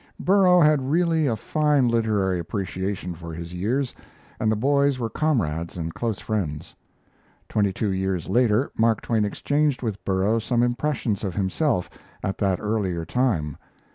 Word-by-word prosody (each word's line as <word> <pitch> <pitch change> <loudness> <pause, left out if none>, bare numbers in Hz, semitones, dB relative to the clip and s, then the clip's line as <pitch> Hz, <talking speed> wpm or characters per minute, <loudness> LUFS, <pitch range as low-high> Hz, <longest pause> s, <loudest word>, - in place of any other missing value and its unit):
Burrough 185 -2 +5
had 150 -4 +3
really 165 -1 +2
a 115 - +1
fine 150 +3 +2
literary 105 -6 +1
appreciation 95 0 -3
for 85 -1 -8
his 85 +1 -7
years, 120 +9 -1 0.5
and 110 - +2
the - - +2
boys 140 +3 +2
were 115 -3 -3
comrades 85 - -1
and 80 -1 -4
close 115 -4 -2
friends. 90 -9 -3 0.7
Twenty 100 -2 +1
two 100 +1 -1
years 95 -2 -1
later 120 +1 +2
Mark 115 -1 +2
Twain 110 -3 +1
exchanged 145 +5 0
with 105 -4 -3
Burrough 100 +4 +1
some 120 +1 +1
impressions 120 -4 -1
of 95 -4 -3
himself 95 - 0 0.4
at 95 - -3
that 95 -3 +1
earlier 100 -6 -1
time. 85 - 0
110 Hz, 150 wpm, -24 LUFS, 95-130 Hz, 0.7 s, Burrough